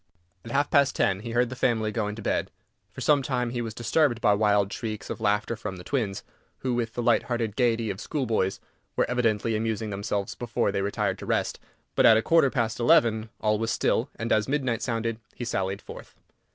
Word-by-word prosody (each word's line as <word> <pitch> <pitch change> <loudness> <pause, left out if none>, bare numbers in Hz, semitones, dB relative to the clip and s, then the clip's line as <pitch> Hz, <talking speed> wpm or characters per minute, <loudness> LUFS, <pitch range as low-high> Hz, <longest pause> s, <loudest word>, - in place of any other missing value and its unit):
At - - -9
half 140 +3 +1
past 140 -3 +4
ten 95 -1 +2
he 115 +3 -7
heard 120 +1 +1
the - - -4
family 110 -4 +1
going 105 -2 -2
to 110 - -8
bed. - - 0 0.4
For - - -9
some 145 -2 +4
time 125 -3 -1
he 120 -1 -2
was 110 -2 -5
disturbed 120 +1 +2
by 105 -3 +4
wild 100 -1 +2
shrieks 110 -3 -5
of - - -6
laughter 105 +2 +1
from 105 -3 -6
the 90 - -10
twins, 105 -4 -2 0.4
who, 130 -1 -1
with 115 -2 -2
the 120 - -2
light 115 -2 +4
hearted 115 -4 -1
gaiety 115 -4 +1
of 95 - -7
schoolboys, 115 -10 -1 0.4
were - - +2
evidently 115 -3 +1
amusing 110 0 -2
themselves 100 0 -2
before 120 -4 -1
they 100 0 -1
retired 100 +1 -1
to - - -8
rest, - - 0 0.3
but - - +5
at 110 - +8
a 110 - +1
quarter 165 -4 +4
past 115 -3 -1
eleven 115 -2 +3
all 105 -1 +2
was 115 0 -1
still, - - +1
and, 115 +1 -4
as 110 -1 +3
midnight 130 -5 0
sounded, 115 -1 -2 0.2
he 120 - -5
sallied 95 -2 -2
forth. - - -11
115 Hz, 210 wpm, -26 LUFS, 105-120 Hz, 0.4 s, at